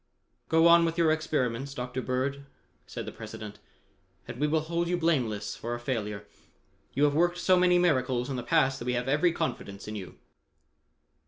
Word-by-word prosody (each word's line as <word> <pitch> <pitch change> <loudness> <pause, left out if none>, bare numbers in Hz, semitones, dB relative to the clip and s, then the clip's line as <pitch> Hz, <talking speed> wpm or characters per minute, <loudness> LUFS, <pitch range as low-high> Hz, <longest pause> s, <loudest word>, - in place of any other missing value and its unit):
"Go 165 0 +4
on 170 0 +7
with 165 0 -1
your 165 -2 +4
experiments, 140 -4 -1
Dr. 125 0 -4
Bird," 135 +2 -2 0.4
said - - -6
the - - -6
President, 105 -1 -9 0.7
"and 120 - -7
we 150 - +2
will 155 +1 +1
hold 170 +2 -2
you 180 +1 0
blameless 120 -12 0
for 120 +1 -4
a - - -6
failure. 105 -5 -3 0.7
You 140 - +2
have 145 -1 +4
worked 175 +3 +2
so 185 - +3
many 180 0 +4
miracles 130 -8 +1
in 135 - -3
the 125 - -3
past 135 0 +2
that 120 - -6
we 125 - 0
have 125 +1 -2
every 150 +6 +3
confidence 105 - -4
in 105 - -5
you." 95 -4 -8
140 Hz, 185 wpm, -28 LUFS, 120-165 Hz, 0.7 s, on